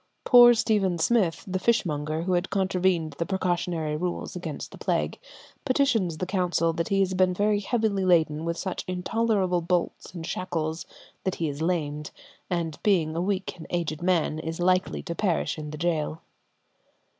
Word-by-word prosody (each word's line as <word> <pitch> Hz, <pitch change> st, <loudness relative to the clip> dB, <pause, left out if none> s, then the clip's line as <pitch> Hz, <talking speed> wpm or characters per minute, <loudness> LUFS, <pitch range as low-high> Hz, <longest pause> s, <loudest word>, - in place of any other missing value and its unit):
Poor 240 Hz, -1 st, +8 dB
Stephen 200 Hz, -6 st, +1 dB
Smith, 185 Hz, -2 st, +1 dB
the 185 Hz, 0 st, -1 dB
fishmonger, 160 Hz, -8 st, 0 dB
who 185 Hz, +1 st, 0 dB
had 175 Hz, +1 st, 0 dB
contravened 185 Hz, -5 st, +1 dB
the 170 Hz, -, 0 dB
precautionary 175 Hz, -5 st, -1 dB
rules 175 Hz, +3 st, -3 dB
against 170 Hz, -5 st, -6 dB
the -, -, -11 dB
plague, -, -, -1 dB, 0.4 s
petitions 240 Hz, -, +1 dB
the 185 Hz, -, -2 dB
council 180 Hz, -3 st, +1 dB
that 170 Hz, 0 st, -2 dB
he 195 Hz, 0 st, +2 dB
has 190 Hz, -1 st, +1 dB
been 185 Hz, -1 st, +2 dB
very 205 Hz, +1 st, +2 dB
heavily 210 Hz, -2 st, 0 dB
laden 160 Hz, -4 st, +3 dB
with 170 Hz, 0 st, -2 dB
such 185 Hz, 0 st, -3 dB
intolerable 185 Hz, -1 st, 0 dB
bolts 175 Hz, +1 st, -1 dB
and 165 Hz, -2 st, -5 dB
shackles 165 Hz, -2 st, -3 dB, 0.4 s
that 190 Hz, -, -1 dB
he 165 Hz, -, -1 dB
is 145 Hz, +1 st, -5 dB
lamed, 150 Hz, -3 st, -1 dB, 0.4 s
and 170 Hz, -3 st, -2 dB
being 165 Hz, -6 st, +2 dB
a 170 Hz, -, 0 dB
weak 190 Hz, 0 st, -2 dB
and 160 Hz, -, -10 dB
aged 165 Hz, -3 st, -2 dB
man, 170 Hz, -3 st, +1 dB
is 160 Hz, +1 st, -5 dB
like 185 Hz, +1 st, +3 dB, 0.2 s
to 170 Hz, -, -3 dB
perish 175 Hz, -2 st, -1 dB
in 150 Hz, -1 st, -6 dB
the 150 Hz, -, -7 dB
gaol. 160 Hz, -2 st, -1 dB
180 Hz, 165 wpm, -26 LUFS, 160-190 Hz, 0.4 s, Poor